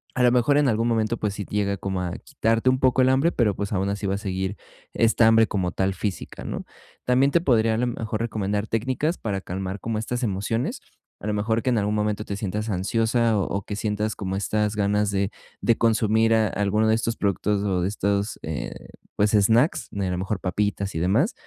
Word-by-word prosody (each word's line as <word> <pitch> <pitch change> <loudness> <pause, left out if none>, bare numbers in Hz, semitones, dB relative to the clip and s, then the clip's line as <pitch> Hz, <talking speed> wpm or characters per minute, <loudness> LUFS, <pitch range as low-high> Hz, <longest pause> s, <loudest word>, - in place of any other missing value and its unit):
A 125 - +2
lo 120 - +5
mejor 125 +4 +3
en 145 -2 +3
algún 115 +1 +1
momento, 115 0 +1
pues, 105 -2 -2
sí 100 - -4
llega 100 -1 0
como 95 -1 -3
a 90 -1 -3
quitarte 115 +3 +1
un 130 0 +2
poco 130 0 +3
el 130 - +4
hambre, 135 +6 +3
pero, 110 -5 +2
pues, 100 +1 -3
aun 95 +1 0
así 100 +1 -3
va 95 - 0
a - - -2
seguir 95 -1 -3 0.4
esta 115 0 +3
hambre 110 0 +5
como 90 -3 -1
tal 95 +1 0
física, 100 -2 -5
¿no? - - -4 0.4
También 130 +3 +3
te 170 - +3
podría 115 -7 +3
a - - 0
lo 125 +1 +1
mejor 110 -2 -3
recomendar 105 -2 -2
técnicas 130 +9 -1
para 100 -3 -3
calmar 95 +2 -5
como 115 -1 -2
estas 120 +3 -3
emociones, 110 +3 -1 0.4
a - - -10
lo 105 - 0
mejor 110 +2 0
que - - +1
en 120 - +2
algún 105 +1 0
momento 105 0 -1
te 100 - -4
sientas 105 +2 -3
ansiosa 110 +3 +1
o - - +1
o 100 0 -3
que 105 - -5
sientas 105 +1 -2
como 95 -1 -3
estas 105 +1 0
ganas 105 0 +1
de 100 +1 0 0.3
de 115 - +3
consumir 110 0 +3
a 110 -1 +3
alguno 105 +2 +1
de 110 - +4
estos 115 0 -1
productos 100 +1 0
o 95 -3 0
de 90 - +1
estos, 100 0 -1
eh, 80 -2 -4 0.5
pues, 105 0 +3
snacks, 115 - +3
a - - -13
lo 90 - -2
mejor 95 +2 -2
papitas 100 +2 -1
y 80 - -1
demás. 110 - +2
105 Hz, 220 wpm, -24 LUFS, 100-115 Hz, 0.5 s, lo